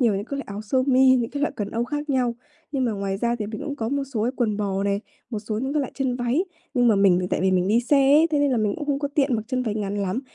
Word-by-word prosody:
nhiều 230 -5 +3
những 200 +1 -3
cái 280 - -5
loại 275 - -4
áo 205 +1 -6
sơ 255 +5 +1
mi, 260 0 +5
những 235 -2 -1
cái 285 - -4
loại - - +1
quần 205 -1 -3
âu 230 +1 -1
khác 295 +3 -4
nhau. 250 -3 +1 0.4
Nhưng 265 -3 0
mà 230 - 0
ngoài 195 -1 -2
ra 235 +3 0
thì 210 - -3
mình 215 0 -6
cũng 285 -1 -4
có 225 -3 -2
một 280 +2 -1
số 215 - 0
cái 245 - 0
quần 215 -4 0
bò 195 -2 -1
này, 200 0 0 0.3
một 220 - -2
số 215 0 -4
những 265 +3 -2
cái 300 - +1
loại 265 - -4
chân 260 -3 -1
váy. 250 +8 0 0.3
Nhưng 245 -1 +4
mà 220 - +5
mình 185 -2 +4
tại - - 0
vì 190 - +2
mình 185 0 +2
đi 230 +3 +4
xe 280 +4 +2 0.2
ấy, 315 +2 +6
thế 295 - +2
nên 285 -1 +2
là 250 - +1
mình 210 -2 +1
cũng 295 - -5
không 280 -1 0
có 285 -1 -2
tiện 275 -4 +2
mặc 215 - -3
chân 255 -1 0
váy 215 -3 -2
ngắn 205 -1 -3
lắm. 200 +5 -1
235 Hz, 330 wpm, -24 LUFS, 205-270 Hz, 0.4 s, ấy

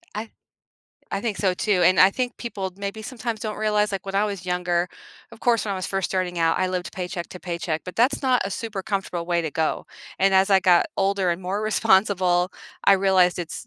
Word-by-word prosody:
I 215 - -2
th - - -25 0.8
I 195 - -1
think 220 -3 -3
so 190 -3 +1
too, 190 -2 +1
and 185 +2 +4
I 190 +1 +7
think 250 -1 -3
people, 195 -6 -5
maybe 200 +2 -5
sometimes, 230 -2 -5
don't 215 -1 -4
realize 210 -1 +1
like, 195 0 -5
when 195 - -5
I 200 - +3
was 200 -3 -5
younger, 180 -1 0 0.5
of - - -13
course, 235 -4 +2
when 200 - -2
I - - -2
was 185 - -4
first 195 -1 -1
starting 180 -2 -2
out, 165 0 +2
I 185 - +1
lived 180 -1 -3
paycheck 180 -1 -5
to 180 - -9
paycheck, 170 -3 -3
but 180 - -8
that's 260 +5 +2
not 255 -4 +3
a 195 - -3
super 215 -2 -4
comfortable 185 -4 -3
way 170 -1 +1
to 160 - -3
go, 160 +2 -1 0.3
and 195 0 +4
as 190 +2 +4
I 190 -1 +6
got 175 -1 +4
older 195 -2 +1
and 170 +2 -3
more 195 +4 -2
responsible, 190 -4 +2 0.3
I 200 - +7
realized 185 -2 +3
it's 165 - -6
190 Hz, 230 wpm, -24 LUFS, 180-210 Hz, 0.8 s, I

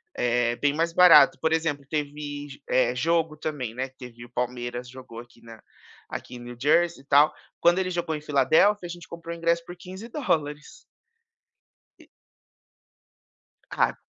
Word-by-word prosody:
É 120 -1 +1
bem 145 -1 +1
mais 165 +2 0
barato, 180 -1 +7
por 160 0 +1
exemplo, 160 -3 -1
teve, 145 -1 -5
eh, 125 -1 +2
jogo 160 +3 0
também, 145 -7 -4
né, 130 +2 -3
teve 120 -1 -11
o - - -17
Palmeiras 120 0 -4
jogou 125 -2 -11
aqui 120 -1 -19
na 115 -1 -13 0.5
aqui - - -7
em - - -8
New 120 0 -9
Jersey 165 0 +2
e - - -35
tal, 145 +2 +5 0.3
quando 175 +2 +4
ele 185 -1 -1
jogou 175 -3 -2
em 150 - -6
Filadélfia 155 +8 +3
a - - -6
gente 175 -1 -9
comprou 170 0 -8
ingresso 170 0 0
por 175 0 -10
$15. 185 - -4 1.2
E - - -19 1.6
Ca - - +1
150 Hz, 155 wpm, -25 LUFS, 125-170 Hz, 1.6 s, barato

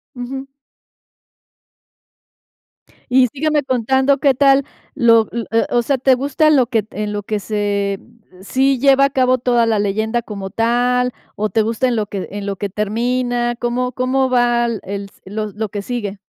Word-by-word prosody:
Ujú. 265 +2 -6 2.6
Y 255 0 +5
sígueme 295 +3 0
contando 265 +2 +1
qué 275 -2 +3
tal 275 +1 +4 0.3
lo 230 -4 +5
o - - -12 0.5
o - - +2
sea, 275 +4 0
¿te 265 +1 +4
gusta 280 +4 +1
lo 265 -5 +4
que 225 -4 -1
en 210 0 -4
lo 205 0 -3
que 210 +1 -3
se 200 -1 -1 0.4
sí 265 +5 +1
lleva 275 +1 +5
a - - -3
cabo 255 -1 +2
toda 240 -1 +2
la 220 -2 +1
leyenda 220 +3 0
como 200 -3 -7
tal? 245 +3 +1 0.2
¿O 215 +1 -1
te 220 +3 +1
gusta 230 +4 0
en 240 - 0
lo 215 -2 -1
que 195 -2 -5
en 205 0 -6
lo 200 -1 -3
que 205 - -3
termina? 240 +4 -1
¿Cómo 250 +1 -1
cómo 260 +2 0
va 240 -1 +2
l 230 -4 -3
el 200 +1 -5
s 195 - -17
lo 215 +2 -4
lo 215 +1 -4
que 205 - -4
sigue? 205 -3 -4
240 Hz, 175 wpm, -18 LUFS, 210-260 Hz, 2.6 s, Y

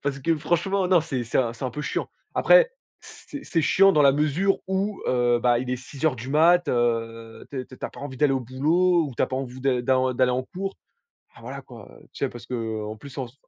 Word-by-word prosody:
parce 140 -1 -2
que 165 +4 +1
franchement 175 +5 0
non, 180 -2 +5
c'est 140 -6 -3
c'est 115 - -1
un 120 -3 +1
c'est 120 +3 -7
un 125 - -1
peu 150 +5 -5
chiant. - - -3 0.3
Après, - - +5 0.3
c'est 290 -1 -10
c'est 165 -3 0
chiant 195 +4 +5
dans 150 - +4
la 140 -1 +6
mesure 155 +7 +1
où, 190 +2 -2
heu, 120 -1 +2
bah 120 -1 +3
il 125 0 -4
est 125 - 0
6:00 130 +4 -9
heures 150 -5 +2
du 120 +4 -7
matin, 170 +4 +4
heu, 115 -2 -2
tu 135 -2 -4
es - - -7
tu 130 - -14
as - - -3
pas - - -12
envie 140 -2 -7
d'aller 145 0 +3
au 135 - 0
boulot 160 +8 +2
ou 135 - -8
tu - - +1
as - - +3
pas 130 - -4
envie 130 -1 -5
de 130 -2 +1
d'en 130 +1 +1
d'aller 125 0 +3
en 130 +1 0
cours. 195 +7 -6 0.6
Bah, - - -16
voilà - - -7
quoi, - - -13 0.2
tu - - -12
sais, - - +1
parce 120 -1 -11
qu'en 110 -3 -4
plus 140 +4 -12
en 130 - -2
ce 125 +4 -22
135 Hz, 255 wpm, -24 LUFS, 125-165 Hz, 0.6 s, la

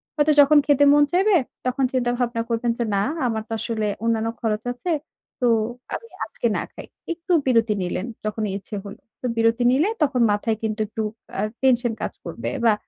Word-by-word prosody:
হয়তো 300 0 +3
যখন 290 +2 +6
খেতে 285 -1 +4
মন 295 0 +6
চাইবে, 385 +3 +4 0.3
তখন 255 +2 0
চিন্তা 245 -2 +1
ভাবনা 240 -2 0
করবেন 230 +1 0
যে, 240 - 0
না 195 - +2 0.2
আমার 220 -2 -2
তো - - -17
আসলে 220 -2 -2 0.2
অন্যান্য 225 -1 +1
খরচ 220 -2 -1
আছে। 295 +9 -4 0.5
তো 245 - +3 0.5
আমি 460 - -8 0.2
আজকে - - -2
না - - -1
খাই। - - -10 0.3
একটু 340 +2 -7
বিরতি 230 -4 +3
নিলেন 180 +2 -2 0.2
যখন 215 +1 -2
ইচ্ছে 205 +2 -6
হইল। 200 0 -9 0.2
তো - - -5
বিরতি 230 +1 +3
নিলে 295 +10 +3
তখন 270 -4 +1
মাথায় 215 +2 0
কিন্তু 220 0 -2
একটু 220 +1 -4 0.4
আ - - +1 0.2
টেনশন 245 -3 +3
কাজ - - -3
করবে। - - -4 0.2
বা 225 - +6
235 Hz, 185 wpm, -23 LUFS, 220-270 Hz, 0.5 s, যখন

